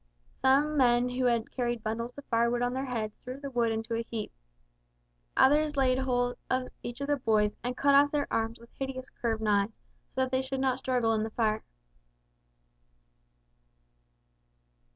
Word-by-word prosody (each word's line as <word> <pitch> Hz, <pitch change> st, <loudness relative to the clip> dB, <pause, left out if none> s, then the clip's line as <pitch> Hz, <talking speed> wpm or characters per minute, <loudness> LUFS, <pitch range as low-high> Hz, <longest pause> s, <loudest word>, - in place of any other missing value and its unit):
Some 290 Hz, +3 st, +3 dB
men 245 Hz, -1 st, +4 dB
who 250 Hz, +1 st, -1 dB
had 235 Hz, -2 st, +1 dB
carried 240 Hz, -3 st, -2 dB
bundles 230 Hz, +3 st, -3 dB
of 285 Hz, -, -9 dB
firewood 235 Hz, +1 st, +1 dB
on 245 Hz, 0 st, 0 dB
their 265 Hz, +1 st, -2 dB
heads 220 Hz, -4 st, -3 dB
threw 255 Hz, +2 st, -8 dB
the 280 Hz, -1 st, -6 dB
wood 235 Hz, -2 st, +1 dB
into 225 Hz, +1 st, -3 dB
a 230 Hz, -, 0 dB
heap; 230 Hz, -2 st, -5 dB, 1.1 s
others 300 Hz, +2 st, +4 dB
laid 260 Hz, -1 st, +3 dB
hold 245 Hz, -2 st, 0 dB
of 255 Hz, 0 st, 0 dB
each 240 Hz, +2 st, -6 dB
of 280 Hz, -, -2 dB
the 290 Hz, 0 st, +2 dB
boys 215 Hz, -4 st, +2 dB
and 250 Hz, +1 st, -3 dB
cut 280 Hz, 0 st, +4 dB
off 285 Hz, +1 st, +6 dB
their 290 Hz, -1 st, +1 dB
arms 225 Hz, +1 st, 0 dB
with 235 Hz, +1 st, -17 dB
hideous 265 Hz, -1 st, -4 dB
curved 225 Hz, -2 st, -2 dB
knives 210 Hz, 0 st, +1 dB, 0.4 s
so 260 Hz, -, +1 dB
that 260 Hz, 0 st, 0 dB
they 260 Hz, 0 st, +2 dB
should 265 Hz, 0 st, -3 dB
not 260 Hz, -1 st, +1 dB
struggle 245 Hz, -4 st, +1 dB
in 220 Hz, -, +1 dB
the 220 Hz, -, -2 dB
fire. 220 Hz, -1 st, 0 dB
245 Hz, 170 wpm, -29 LUFS, 230-265 Hz, 1.1 s, off